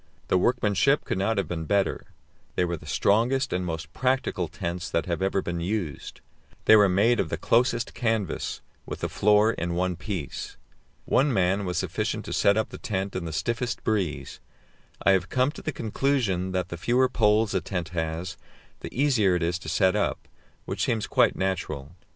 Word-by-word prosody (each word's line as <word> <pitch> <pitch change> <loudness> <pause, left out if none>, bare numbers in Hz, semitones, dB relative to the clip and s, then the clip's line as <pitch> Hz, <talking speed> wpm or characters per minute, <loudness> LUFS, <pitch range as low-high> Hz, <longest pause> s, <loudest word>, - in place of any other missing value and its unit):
The - - +4
workmanship 120 +6 +2
could - - -2
not 105 +3 +1
have 100 - 0
been 80 -2 -4
better; 100 +3 0 0.5
they 90 - +2
were 85 0 -2
the 75 -2 -12
strongest 120 - +2
and 90 0 0
most 85 -1 -5
practical 130 0 0
tents 85 +2 -4
that 85 - 0
have 85 0 -2
ever 95 0 +1
been 85 -1 -3
used. 85 -5 -4 0.4
They 110 - +8
were 105 -2 +6
made 110 +6 +3
of - - 0
the - - -2
closest 120 0 +1
canvas, 110 -7 -1 0.3
with - - -6
the - - -1
floor 105 +2 +4
in 85 -5 -3
one 90 0 0
piece. 90 -4 -5 0.5
One 140 +2 +3
man 95 -1 +1
was 90 -2 -2
sufficient - - -2
to - - -5
set 100 +1 +3
up 110 - 0
the - - -9
tent 95 -2 -3
in 90 -2 -3
the 80 - -4
stiffest 120 +9 -2
breeze; 80 -11 -2 0.6
I 100 - +5
have 95 -1 +2
come 130 +2 +2
to - - -10
the 155 - -2
conclusion 110 - 0
that 95 -1 -2
the 85 - -5
fewer 120 +8 +2
poles 105 -3 +2
a 95 - +1
tent 90 -2 -4
has, 85 +2 -3 0.4
the - - -7
easier 115 -10 +3
it 90 - 0
is 85 +1 0
to 80 - -7
set 95 +3 +3
up, 105 - -1 0.4
which - - -2
seems 110 -3 0
quite - - +3
natural. 80 -7 -3
95 Hz, 190 wpm, -26 LUFS, 85-110 Hz, 0.6 s, They